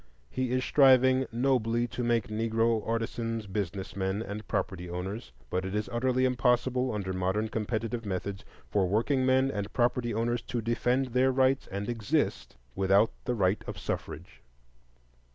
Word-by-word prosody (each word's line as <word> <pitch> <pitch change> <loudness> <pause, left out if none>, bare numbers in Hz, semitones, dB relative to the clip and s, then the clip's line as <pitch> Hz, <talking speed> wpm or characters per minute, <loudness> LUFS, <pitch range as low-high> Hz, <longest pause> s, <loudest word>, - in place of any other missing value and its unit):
He 130 -1 -1
is 130 0 +1
striving 130 -1 +5
nobly 120 -1 +1
to 125 - -4
make 120 -3 +1
Negro 115 +1 +1
artisans 115 0 -2
business 95 -2 -4
men 95 +2 -1
and 105 0 -7
property 90 -4 -2
owners; 90 - -5 0.2
but 90 - 0
it 95 +2 -4
is 105 0 -1
utterly 130 +2 +2
impossible, 125 0 +1
under 100 -3 -3
modern 95 +4 0
competitive 115 +1 -2
methods, 100 0 -4 0.3
for 100 -3 +2
workingmen 130 +5 +2
and 100 -2 -4
property 120 -1 +1
owners 115 +2 0
to 120 - -4
defend 125 +3 0
their 130 +2 +3
rights 130 +1 +2
and 100 +1 -4
exist 105 - -1 0.2
without 100 +3 +3
the 125 -1 0
right 95 -1 +1
of - - -5
suffrage. - - -6
115 Hz, 150 wpm, -29 LUFS, 100-125 Hz, 0.3 s, striving